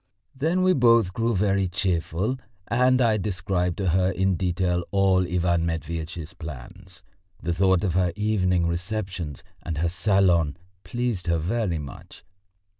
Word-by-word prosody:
Then 165 Hz, +7 st, +1 dB
we 185 Hz, 0 st, +4 dB
both 115 Hz, -, +4 dB
grew 115 Hz, +1 st, 0 dB
very 100 Hz, 0 st, +2 dB
cheerful, 90 Hz, +5 st, -1 dB, 0.3 s
and 125 Hz, +3 st, +3 dB
I 110 Hz, -2 st, +3 dB
described 90 Hz, -3 st, -1 dB
to 95 Hz, -3 st, 0 dB
her 90 Hz, +2 st, +2 dB
in 95 Hz, 0 st, +1 dB
detail 90 Hz, 0 st, 0 dB
all 95 Hz, -2 st, +3 dB
Ivan 85 Hz, -2 st, +1 dB
Matveitch's 80 Hz, 0 st, -4 dB
plans. 80 Hz, +2 st, -10 dB, 0.4 s
The 85 Hz, 0 st, -2 dB
thought 95 Hz, +1 st, +3 dB
of 95 Hz, -4 st, 0 dB
her 90 Hz, -1 st, +2 dB
evening 95 Hz, -5 st, +1 dB
receptions 90 Hz, -, -4 dB, 0.2 s
and 80 Hz, -3 st, -4 dB
her 85 Hz, +2 st, +1 dB
salon 90 Hz, -5 st, +2 dB, 0.3 s
pleased 120 Hz, -8 st, -3 dB
her 85 Hz, 0 st, +2 dB
very 90 Hz, +2 st, -1 dB
much. 70 Hz, -3 st, -10 dB
90 Hz, 140 wpm, -25 LUFS, 85-105 Hz, 0.4 s, we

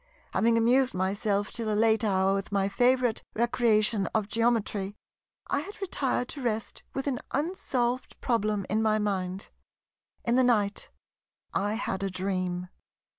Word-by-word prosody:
Having 230 Hz, +1 st, +3 dB
amused 245 Hz, +1 st, +3 dB
myself 200 Hz, +2 st, 0 dB
till 225 Hz, -2 st, -2 dB
a 210 Hz, -, +1 dB
late 220 Hz, 0 st, +3 dB
hour 195 Hz, -2 st, +2 dB
with 195 Hz, 0 st, -3 dB
my 195 Hz, -1 st, +2 dB
favourite 245 Hz, +3 st, +2 dB
recreation 220 Hz, -3 st, +2 dB
of 215 Hz, -2 st, +1 dB
Geometry, 215 Hz, -3 st, 0 dB, 0.5 s
I 280 Hz, -, 0 dB
had 395 Hz, +8 st, -8 dB
retired 275 Hz, -10 st, -1 dB
to 285 Hz, -, -6 dB
rest 225 Hz, -3 st, -2 dB
with 270 Hz, -, -2 dB
an 265 Hz, -4 st, -1 dB
unsolved 260 Hz, -6 st, -1 dB
problem 215 Hz, -5 st, 0 dB
in 215 Hz, +2 st, +1 dB
my 215 Hz, -1 st, +3 dB
mind. 195 Hz, -2 st, -2 dB, 0.7 s
In 235 Hz, +1 st, +3 dB
the 260 Hz, -, +5 dB
night 210 Hz, -5 st, +1 dB, 0.6 s
I 205 Hz, +2 st, 0 dB
had 195 Hz, -4 st, -2 dB
a 195 Hz, -, -1 dB
dream. 185 Hz, -1 st, -2 dB
215 Hz, 145 wpm, -28 LUFS, 200-245 Hz, 0.7 s, the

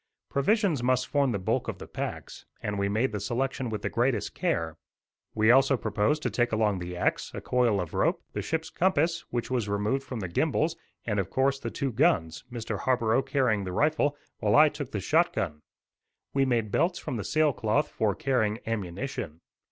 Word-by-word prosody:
Provisions 175 Hz, -, +2 dB
must 125 Hz, +1 st, +2 dB
form 140 Hz, -3 st, +2 dB
the 105 Hz, -, 0 dB
bulk 95 Hz, -, -1 dB
of -, -, -4 dB
the -, -, -8 dB
packs, -, -, -6 dB
and 105 Hz, -1 st, -3 dB
we 100 Hz, 0 st, +1 dB
made 110 Hz, +6 st, +1 dB
the 105 Hz, -, -3 dB
selection 130 Hz, +4 st, -2 dB
with 110 Hz, -2 st, -4 dB
the -, -, 0 dB
greatest 120 Hz, -2 st, 0 dB
care. 80 Hz, -1 st, -1 dB, 0.6 s
We 110 Hz, +1 st, +5 dB
also 135 Hz, +1 st, +5 dB
proposed 110 Hz, +7 st, 0 dB
to -, -, 0 dB
take 120 Hz, 0 st, +1 dB
along 105 Hz, -3 st, +1 dB
the 90 Hz, 0 st, -6 dB
axe, -, -, 0 dB
a -, -, -3 dB
coil 120 Hz, -5 st, +2 dB
of 90 Hz, -3 st, -4 dB
rope, -, -, +1 dB
the -, -, -2 dB
ship's 160 Hz, 0 st, -3 dB
compass, 170 Hz, -2 st, +1 dB
which 120 Hz, +1 st, -3 dB
was 120 Hz, -5 st, 0 dB
removed 105 Hz, +7 st, 0 dB
from 125 Hz, -4 st, -6 dB
the 95 Hz, -, -3 dB
gimbals, 155 Hz, -, +1 dB, 0.3 s
and, 105 Hz, -3 st, 0 dB
of 95 Hz, -, -2 dB
course, 135 Hz, +1 st, +1 dB
the 115 Hz, -, -4 dB
two 135 Hz, +2 st, -2 dB
guns, 80 Hz, -7 st, +1 dB
Mr. 115 Hz, -4 st, -4 dB
Harborough 120 Hz, -1 st, +2 dB
carrying 125 Hz, -8 st, +1 dB
the 90 Hz, -1 st, -4 dB
rifle, 145 Hz, +2 st, +2 dB, 0.2 s
while 105 Hz, 0 st, +2 dB
I 150 Hz, +1 st, +8 dB
took 145 Hz, -3 st, -6 dB
the 105 Hz, -, -3 dB
shot -, -, +2 dB
gun. 75 Hz, 0 st, -3 dB, 0.7 s
We 135 Hz, 0 st, +3 dB
made 115 Hz, -5 st, 0 dB
belts 175 Hz, -, +2 dB
from 125 Hz, -, -4 dB
the 105 Hz, -, -3 dB
sail 155 Hz, +3 st, +2 dB
cloth 110 Hz, -2 st, +1 dB
for 105 Hz, -3 st, 0 dB
carrying 110 Hz, -6 st, +1 dB
ammunition. 100 Hz, -, -4 dB
120 Hz, 200 wpm, -28 LUFS, 105-135 Hz, 0.7 s, I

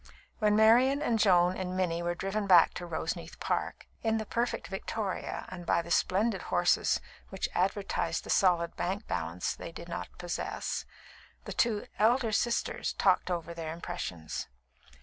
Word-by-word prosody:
When 210 Hz, -2 st, +3 dB
Marian 240 Hz, +6 st, +5 dB
and 240 Hz, -7 st, +1 dB
Joan 180 Hz, -3 st, +4 dB
and 185 Hz, -1 st, -3 dB
Minnie 170 Hz, -2 st, 0 dB
were 175 Hz, 0 st, -1 dB
driven 195 Hz, +3 st, -2 dB
back 175 Hz, -3 st, +7 dB
to 175 Hz, -, -6 dB
Roseneath 160 Hz, -2 st, -4 dB
Park -, -, -2 dB, 0.2 s
(in 225 Hz, -1 st, +1 dB
the 220 Hz, -, -3 dB
perfect 235 Hz, +3 st, -1 dB
victoria 195 Hz, 0 st, -4 dB
and 180 Hz, -1 st, -7 dB
by 170 Hz, 0 st, +1 dB
the 170 Hz, -, -9 dB
splendid 205 Hz, +7 st, +2 dB
horses -, -, +2 dB, 0.3 s
which -, -, -2 dB
advertised -, -, 0 dB
the -, -, -4 dB
solid 175 Hz, -3 st, +3 dB
bank 195 Hz, +4 st, -2 dB
balance 85 Hz, +2 st, -2 dB
they -, -, -8 dB
did 170 Hz, +1 st, -9 dB
not 170 Hz, -, -4 dB
possess), 175 Hz, -1 st, -3 dB, 0.6 s
the -, -, -5 dB
two 220 Hz, -4 st, +1 dB
"elder 230 Hz, +2 st, +3 dB
sisters" 235 Hz, +3 st, 0 dB
talked -, -, +2 dB
over 170 Hz, -1 st, -3 dB
their 165 Hz, -2 st, -5 dB
impressions. 85 Hz, -, -5 dB
185 Hz, 155 wpm, -30 LUFS, 170-220 Hz, 0.6 s, back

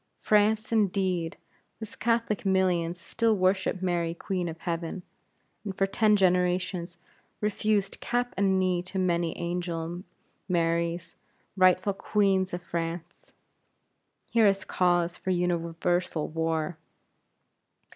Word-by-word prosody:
France, 215 Hz, +1 st, +2 dB
indeed! 190 Hz, -5 st, +1 dB, 0.4 s
whose 220 Hz, -2 st, -8 dB
Catholic 230 Hz, -2 st, 0 dB
millions 180 Hz, -3 st, +1 dB
still 225 Hz, +4 st, +1 dB
worship 185 Hz, 0 st, +1 dB
Mary 170 Hz, -2 st, 0 dB
Queen 180 Hz, -1 st, -2 dB
of 165 Hz, -, -7 dB
Heaven; 170 Hz, +1 st, -3 dB, 0.6 s
and 195 Hz, -3 st, -5 dB
for 195 Hz, -, +3 dB
ten 210 Hz, +2 st, +3 dB
generations 180 Hz, -2 st, +1 dB, 0.4 s
refused 210 Hz, -1 st, 0 dB
cap 245 Hz, 0 st, -1 dB
and 195 Hz, -1 st, +2 dB
knee 185 Hz, -1 st, +1 dB
to 185 Hz, +2 st, -7 dB
many 175 Hz, -3 st, 0 dB
angel 175 Hz, -1 st, -3 dB, 0.5 s
Maries, 170 Hz, 0 st, 0 dB, 0.4 s
rightful 185 Hz, +1 st, +4 dB
Queens 195 Hz, -2 st, +1 dB
of 175 Hz, 0 st, -5 dB
France. 170 Hz, 0 st, -5 dB, 1.0 s
Here 225 Hz, -2 st, +5 dB
is 195 Hz, 0 st, +1 dB
cause 175 Hz, -1 st, +1 dB
for -, -, -5 dB
universal 175 Hz, -1 st, 0 dB
war. 160 Hz, 0 st, -2 dB
180 Hz, 110 wpm, -28 LUFS, 170-195 Hz, 1.0 s, Here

